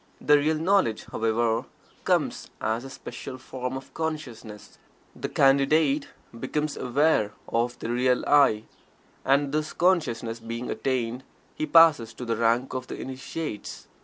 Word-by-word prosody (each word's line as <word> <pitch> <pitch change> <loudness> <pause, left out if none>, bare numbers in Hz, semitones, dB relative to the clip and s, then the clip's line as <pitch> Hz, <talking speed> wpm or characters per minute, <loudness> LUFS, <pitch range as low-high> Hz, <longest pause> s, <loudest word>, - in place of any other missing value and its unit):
The 150 0 +5
real 155 +2 +1
knowledge, 165 - +1
however, 115 +1 0 0.4
comes - - 0
as 110 +2 -1
a 135 - -8
special 130 0 -8
form 130 0 -5
of 135 - -12
consciousness. 125 -10 -6 0.4
The - - -4
Candidate 140 +2 +3 0.3
becomes 150 +4 -2
"aware" 125 -5 +1
of 120 +1 -1
the 115 - -5
real 125 +1 +2
"I," 140 -7 +4 0.6
and 140 +1 +2
this 155 +1 -2
consciousness 120 -11 +1
being 115 +2 -5
attained, 125 -1 -2 0.3
he 155 - -3
passes 150 -9 +5
to 125 - -6
the 115 -1 0
rank 115 +3 +1
of 130 0 -4
the - - -7
Initiates. 130 -2 -6
130 Hz, 135 wpm, -26 LUFS, 115-150 Hz, 0.6 s, The